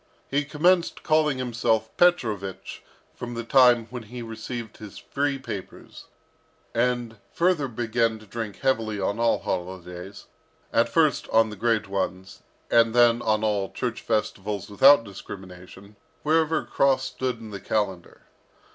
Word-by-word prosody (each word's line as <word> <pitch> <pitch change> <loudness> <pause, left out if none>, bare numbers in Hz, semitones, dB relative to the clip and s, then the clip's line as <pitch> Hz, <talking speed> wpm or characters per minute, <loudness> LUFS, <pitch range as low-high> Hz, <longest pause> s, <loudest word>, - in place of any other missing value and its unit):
He 145 +1 +2
commenced 170 +4 +2
calling 155 -3 +2
himself 115 -3 -1
Petrovich 110 - 0 0.3
from 120 -1 -7
the 115 - -4
time 125 -2 +5
when 125 -1 -5
he 120 +2 -8
received 115 0 -7
his 105 -2 -10
free 140 0 -2
papers, 115 -8 -9 0.7
and 120 -1 0
further 170 -5 +1
began 115 -1 0
to 110 - -15
drink 110 0 -6
heavily 110 -5 0
on 100 +3 -1
all 115 0 +3
holidays, 90 +1 -6 0.5
at - - +3
first - - +2
on 110 -1 +3
the - - -7
great 115 0 0
ones, 95 -1 -4 0.3
and 115 0 +4
then 120 -1 +5
on 110 -1 +1
all 105 -3 0
church 120 -3 -3
festivals 105 -2 -2
without 135 +4 +7
discrimination, 95 0 -11 0.3
wherever 160 0 +2
a - - -13
cross 135 -1 +2
stood 130 -2 -3
in 110 -2 -10
the 100 -2 -7
calendar. 95 -5 -3
115 Hz, 140 wpm, -25 LUFS, 100-130 Hz, 0.7 s, without